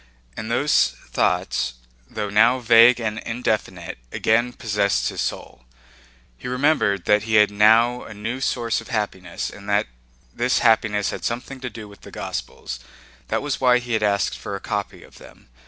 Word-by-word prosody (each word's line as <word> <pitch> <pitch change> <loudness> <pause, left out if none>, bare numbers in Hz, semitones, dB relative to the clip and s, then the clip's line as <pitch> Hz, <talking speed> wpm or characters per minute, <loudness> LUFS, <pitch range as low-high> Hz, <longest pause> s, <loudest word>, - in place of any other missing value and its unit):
And 110 +1 -6
those 145 +5 +2
thoughts, 60 -1 0 0.3
though 105 -2 -4
now 115 +5 +5
vague 120 0 +6
and 110 -1 -3
indefinite, 110 - -3
again 120 +2 +1
possessed 100 - 0
his - - -4
soul. 65 -1 -5 0.7
He - - -7
remembered 125 - +1
that 105 0 +4
he 110 -1 0
had 105 -1 +5
now 115 +4 +4
a - - -9
new 115 +6 -4
source 120 -4 -1
of 115 - -13
happiness 100 -6 -3
and 105 0 -11
that 105 +1 +2 0.5
this 125 +1 +1
happiness 110 -3 +2
had - - -7
something 125 +3 -4
to 125 -1 -5
do 110 -3 -10
with 100 0 -16
the - - -12
Gospels. 65 - -6 0.5
That - - -1
was 145 -2 -3
why 125 -1 +5
he 120 -2 -2
asked 100 -3 +1
for - - -5
a - - -5
copy - - -4
of - - -17
them. - - -17
110 Hz, 170 wpm, -22 LUFS, 105-120 Hz, 0.7 s, vague